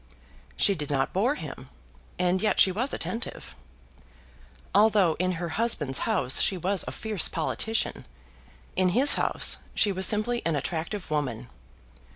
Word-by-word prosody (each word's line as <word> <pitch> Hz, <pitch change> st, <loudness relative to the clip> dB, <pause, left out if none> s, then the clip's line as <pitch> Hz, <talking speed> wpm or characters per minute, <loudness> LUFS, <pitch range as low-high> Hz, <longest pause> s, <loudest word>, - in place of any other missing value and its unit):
She 200 Hz, -, +3 dB
did 150 Hz, -6 st, -6 dB
not 135 Hz, -2 st, -1 dB
bore 235 Hz, +10 st, +1 dB
him, 135 Hz, -, -9 dB, 0.5 s
and 180 Hz, +1 st, +1 dB
yet 215 Hz, -, +1 dB
she 190 Hz, -, +6 dB
was 245 Hz, +9 st, -2 dB
attentive. 230 Hz, -, -5 dB, 1.2 s
Although 205 Hz, -4 st, +4 dB
in 185 Hz, 0 st, 0 dB
her 170 Hz, 0 st, -4 dB
husband's 160 Hz, -, 0 dB
house 185 Hz, -, +3 dB
she 190 Hz, -, +1 dB
was 190 Hz, +2 st, +1 dB
a -, -, -3 dB
fierce 215 Hz, -6 st, -1 dB
politician, 220 Hz, +7 st, -2 dB, 0.7 s
in 185 Hz, 0 st, +2 dB
his 280 Hz, +3 st, +7 dB
house -, -, +1 dB, 0.2 s
she 205 Hz, -, +3 dB
was 190 Hz, 0 st, +1 dB
simply 230 Hz, +3 st, +1 dB
an 165 Hz, -2 st, 0 dB
attractive 170 Hz, +6 st, -4 dB
woman. 125 Hz, -6 st, -3 dB
185 Hz, 145 wpm, -26 LUFS, 155-215 Hz, 1.2 s, his